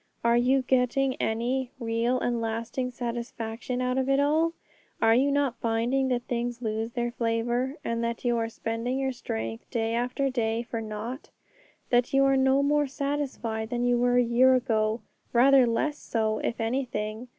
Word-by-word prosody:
Are 235 0 +4
you 255 +2 +3
getting 260 +1 +2
any 245 +3 -1
real 235 +2 0
and 240 -2 -1
lasting 230 +3 -2
satisfaction 240 0 -4
out 250 +1 0
of 265 0 -1
it 275 0 +3
all? 315 +3 +2 0.5
Are 225 - +5
you 265 +4 +3
not 280 -3 0
finding 235 +4 +1
that 245 -2 0
things 240 0 -3
lose 225 0 -3
their 240 -1 -1
flavour, 240 +3 -1
and 230 0 -1
that 235 +1 -3
you 240 -1 +2
are 225 0 -1
spending 230 +3 -3
your 270 -1 0
strength 115 - -5
day 225 -1 -1
after 250 +3 0
day 230 -2 0
for 230 -1 -4
nought? 220 +5 -6 0.6
that 245 +1 +2
you 275 - +5
are 270 0 +4
no 265 +1 +3
more 295 0 +2
satisfied 265 -6 -3
than 245 0 -1
you 245 0 +3
were 245 0 +3
a 245 - +5
year 250 +2 +5
ago 220 -3 0 0.3
rather 260 +1 +6
less 290 +6 0
so, 220 -1 -1
if 235 - -3
anything? 230 -1 -2
240 Hz, 175 wpm, -27 LUFS, 230-260 Hz, 0.6 s, rather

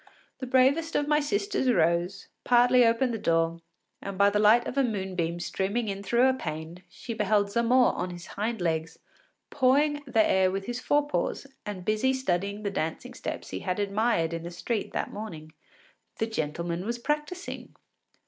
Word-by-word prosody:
The 260 - -5
bravest 270 +6 +3
of 290 - +1
my 300 0 +3
sisters 390 -2 0
rose, 175 +1 +1 0.2
partly 245 0 +5
opened 235 +2 +2
the 225 - -3
door, 165 -2 +1 0.4
and 195 -1 -6
by 200 +1 +5
the 210 - +1
light 220 +3 +5
of - - -5
a 275 - +3
moonbeam 185 -7 -2
streaming 200 +6 -2
in 195 0 -4
through 235 +6 +3
a 260 - +3
pane, 160 -5 -6
she 230 +6 -7
beheld 210 -1 +1
Zamore 235 +3 +3
on 180 - -3
his 175 0 -8
hind 220 +1 -3
legs, 165 -1 -1 0.5
pawing 290 +2 +3
the 225 -4 +3
air 190 0 +3
with 195 +1 -3
his 245 +1 -4
fore 290 +2 +1
paws, 295 - -2 0.2
and 190 -3 -6
busy 215 +6 +2
studying 200 -4 -2
the 200 - -1
dancing 160 -4 -3
steps - - -6
he 95 - -4
had 180 - -2
admired 200 -4 +1
in 165 - -3
the 170 - -6
street 210 +6 -3
that - - -3
morning. 160 -7 -8 0.6
The 225 - 0
gentleman 170 -3 -3
was 235 +4 -3
practising! 300 +8 -4
210 Hz, 175 wpm, -27 LUFS, 175-250 Hz, 0.6 s, partly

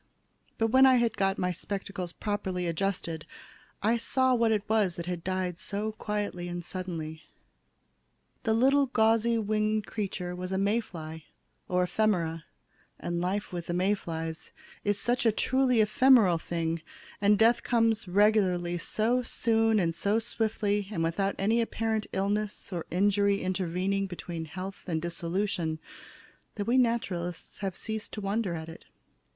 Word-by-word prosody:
But 225 -1 +1
when 265 +1 +7
I 260 - +6
had 235 -2 +2
got 195 0 +1
my 180 0 0
spectacles 190 0 -5
properly 190 -3 -3
adjusted, 170 -2 -2 0.6
I 225 +3 +3
saw 260 +2 +2
what 230 -2 +3
it 210 -2 0
was 210 -5 +2
that 170 - -5
had 175 -2 -4
died 185 -2 -2
so 210 +2 -3
quietly 205 -4 -3
and 175 -1 -5
suddenly. 165 -4 -5 1.2
The 220 - +1
little 275 +4 +4
gauzy 230 0 +3
winged 215 0 0
creature 185 -4 -4
was 180 +1 -5
a 190 - 0
May 200 +4 +2
fly, 160 -6 -8 0.4
or 180 0 +2
ephemera, 175 -5 0 0.5
and 175 0 -2
life 190 +2 -2
with 175 -1 -4
the 175 - -1
May 185 +3 +3
flies 165 -4 -5 0.3
is 205 -1 +1
such 240 +4 +1
a 225 - +5
truly 255 +1 +2
ephemeral 215 -5 +5
thing, 165 -1 -2 0.4
and 205 0 +5
death 235 +2 +4
comes 225 -3 +1
regularly 180 -3 +2
so 230 +7 +1
soon 225 -2 +2
and 170 -3 +1
so 200 +5 +1
swiftly, 215 -3 -1
and 165 -5 -1
without 195 +4 0
any 225 +4 +2
apparent 225 -1 -1
illness 200 +1 -1
or 170 -2 -4
injury 200 +2 +2
intervening 185 +1 -1
between 170 -2 -6
health 185 +4 -7
and 165 -3 0
dissolution, 170 0 -1 0.8
that 205 - -3
we 240 - +2
naturalists 200 -9 0
have 195 -3 -3
ceased 220 -1 -4
to - - -4
wonder 200 -2 -1
at 160 -1 -6
it. 165 - -11
200 Hz, 150 wpm, -29 LUFS, 175-220 Hz, 1.2 s, when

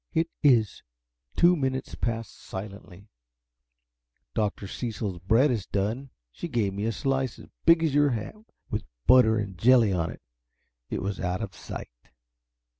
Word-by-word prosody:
"It 165 +1 +1
is." 120 -8 +3 0.5
Two 175 +1 +5
minutes 130 -3 -2
passed 115 -1 -3
silently. 100 0 -9 1.3
"Dr. 105 -2 -1
Cecil's 105 -4 -4
bread 115 +10 +3
is 110 -6 -2
done 110 +7 -2 0.2
she 175 - -6
gave 115 - 0
me 100 +2 -3
a 115 - +1
slice 135 0 -1
as - - -13 0.2
big 165 0 +6
as 155 -4 +1
your 145 0 +4
hat, 115 -4 -3 0.4
with - - -1 0.2
butter 110 -4 +6
and 100 -4 -4
jelly 115 -2 +5
on 85 -2 0
it. - - -10 0.7
It - - -3
was 100 0 -3
out 90 +4 -2
of 100 - -6
sight." - - -8
110 Hz, 150 wpm, -27 LUFS, 100-130 Hz, 1.3 s, big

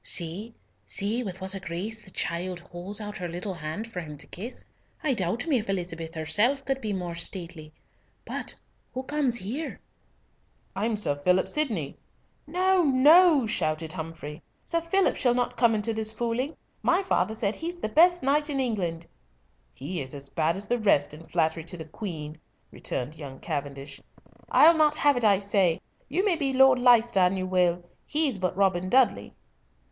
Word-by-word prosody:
See! 185 +7 0 0.3
see! 205 - 0
with 190 -5 -6
what 190 0 -3
a 195 - -5
grace 195 +5 -5
the 210 - -12
child 180 0 -2
holds 180 +3 -7
out 210 -1 -6
her 180 - -3
little 180 +4 -5
hand 170 +8 -6
for 180 - -3
him 150 -3 -8
to - - -11
kiss. 225 +8 -8 0.4
I 290 -4 +2
doubt 220 - -1
me 290 -7 +2
if 215 - -7
Elizabeth 165 -3 -4
herself 225 - +1
could 270 0 -1
be 215 - -2
more 180 -3 -3
stately. 170 -2 -7 0.5
But - - -5 0.4
who 260 - -3
comes 280 -3 0
here?" 240 +10 -4 1.0
"I'm 215 +3 0
Sir 205 -8 0
Philip 180 +6 +2
Sydney." 220 - 0 0.5
"No, 370 +3 +3
no," 300 +1 +6
shouted 160 -5 -1
Humfrey, 160 -2 -7 0.2
"Sir 335 -1 0
Philip 375 +4 +2
shall 245 -2 +2
not 245 0 0
come 230 -1 +4
into 215 +2 -1
this 220 0 -1
fooling. 240 +6 -2 0.2
My 375 +3 +2
father 220 - +1
says 215 -1 0
he's 345 +2 -4
the - - -2
best 350 +8 +4
knight 295 +3 +2
in 275 -2 -1
England." 180 -10 -2 0.7
"He 150 - -5
is 130 +1 -6
as 140 0 -8
bad 165 +2 0
as 200 - -4
the 245 +3 0
rest 175 -10 +3
in 160 +2 -12
flattery 160 -1 0
to 175 - -6
the 160 - -7
Queen," 155 -3 -7 0.3
returned 145 +5 -4
young 135 -3 -8
Cavendish. 140 0 -5 0.5
"I'll 330 +2 +7
not 305 -1 +4
have 290 -2 +3
it, 245 - -1
I 205 -3 +5
say. 195 -4 +2 0.3
You 375 - 0
may 365 -5 +2
be 275 -4 0
Lord 265 -1 +6
Leicester 240 -4 +5
an 180 +1 +3
you 185 - -2
will! 180 -1 +1 0.2
He's 295 -8 +2
but 185 0 -1
Robin 185 -2 +2
Dudley." 245 - +2
200 Hz, 180 wpm, -27 LUFS, 170-255 Hz, 1.0 s, I'll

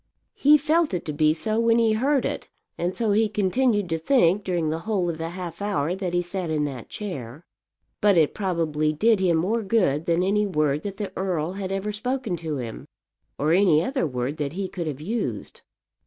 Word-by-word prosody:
He 295 +2 +5
felt 310 - +1
it 175 - -4
to 150 - -3
be 155 +1 +3
so 215 +8 0
when 230 0 +3
he 225 -2 +3
heard 270 +4 +1
it, - - -4 0.3
and 175 +2 -2
so 225 -3 +1
he 215 +1 +3
continued 210 +1 +1
to 165 0 -1
think 200 - +3
during 170 -5 -1
the 160 - -2
whole 190 0 -1
of 160 - -8
the 165 0 -3
half 175 0 -7
hour 180 -6 0
that 185 -2 -3
he 175 - +2
sat 175 -1 -4
in 150 -1 0
that 130 -5 -6
chair. 145 - -7 0.6
But 205 -3 +4
it 155 -3 +3
probably 160 -6 0
did 220 +7 +3
him 175 -3 +2
more 210 +8 0
good 190 -8 +1
than 170 +1 +2
any 210 +2 +2
word 150 -5 0
that 200 +1 -6
the 205 -2 -5
earl 180 -4 -1
had 190 0 -5
ever 195 +2 -2
spoken 225 -1 -2
to 160 -3 -4
him, 115 -3 -7 0.5
or 150 +3 +1
any 175 -4 +4
other 260 - -1
word 125 +2 -3
that 145 -1 -3
he 190 +1 -3
could 175 -3 -5
have 145 -2 -5
used. 175 - -4
180 Hz, 210 wpm, -24 LUFS, 155-210 Hz, 0.6 s, He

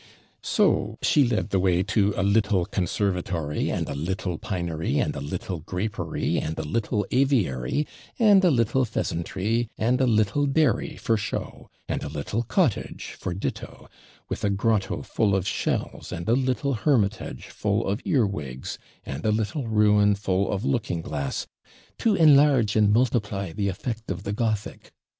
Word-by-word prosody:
So - - +1
she 145 - +4
led 115 -4 0
the 95 - +2
way 90 -1 +2
to 105 -1 +2
a 95 - +1
little 100 -2 +2
conservatory, 90 -5 -1
and - - -2
a - - -3
little 85 +3 -3
pinery, 85 -6 -2
and - - 0
a - - -4
little 85 +4 -4
grapery, 90 0 -2
and 80 +1 -4
a 80 - -2
little 105 +5 -1
aviary, 125 - +1 0.3
and 205 -5 +6
a 180 - +6
little 130 -1 +2
pheasantry, 110 +1 -1
and 125 +4 +1
a 130 - +3
little 110 +5 +2
dairy 140 -2 +1
for 115 - +1
show, 100 - -5 0.2
and - - -2
a - - -5
little 75 +10 -2
cottage 125 - -1
for 90 - -3
ditto, 95 - -5 0.4
with - - -5
a 105 - +2
grotto 100 0 0
full 100 -3 +1
of 95 0 -1
shells, - - -2
and 85 +1 -5
a 115 - +4
little 130 +2 +1
hermitage 110 -5 0
full 105 +1 -1
of 100 +2 -1
earwigs, 85 - -1 0.3
and 70 - -5
a 110 - +2
little 110 +5 -1
ruin 105 -1 +4
full 100 -1 0
of 100 +4 -2
looking 115 -11 -1
glass, 70 -3 -3 0.5
'to 220 -3 +3
enlarge 145 - +5
and 105 -2 +4
multiply 105 -5 +1
the 100 -2 -1
effect 110 +4 -5
of 95 -1 -4
the 100 - -3
Gothic.' 110 -2 -3
105 Hz, 160 wpm, -25 LUFS, 90-120 Hz, 0.5 s, and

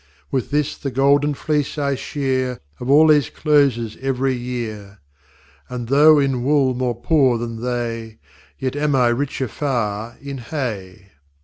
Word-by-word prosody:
With 130 -4 -1
this 150 -1 0
the 140 - -3
golden 140 +2 +2
fleece 150 +1 -1
I 140 -1 0
shear 130 -2 -2 0.2
Of 125 - -5
all 155 +3 +6
these 145 -5 +4
Closes 135 -8 +1
ev'ry 135 0 -1
Year. 115 -5 -5 0.7
And 120 -2 -5
though 150 +3 +6
in 135 -3 +1
Wooll 135 -1 +2
more 125 -2 -2
poor 135 -5 +3
than 115 -1 -5
they, 115 -2 -3 0.4
Yet 130 0 -3
am 145 -1 +1
I 125 -2 +4
richer 135 +1 -1
far 115 -4 -3
in 140 -1 -7
Hay. 105 -8 -5
130 Hz, 145 wpm, -20 LUFS, 120-140 Hz, 0.7 s, all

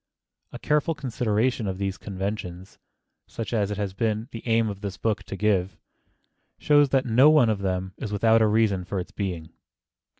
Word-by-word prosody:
A - - -7
careful 150 +2 0
consideration 120 -3 -1
of 95 -1 -3
these 95 0 -3
conventions, 95 -2 -6 0.5
such 115 +1 -6
as 105 -3 +1
it 105 - -4
has 100 -2 -3
been 110 +2 -2
the 115 - -7
aim 115 -1 +2
of 100 -2 -6
this 100 -3 -5
book 105 -3 -1
to - - -6
give, 95 -2 0 0.8
shows 145 -1 +4
that 135 0 +2
no 125 +5 +5
one 150 -8 +5
of 105 - -2
them 95 -1 -2
is 110 -6 -5
without 110 +2 +3
a 110 - +4
reason 105 -3 +2
for 95 +2 -4
its 90 - -6
being. 85 -5 -5
105 Hz, 180 wpm, -25 LUFS, 95-115 Hz, 0.8 s, no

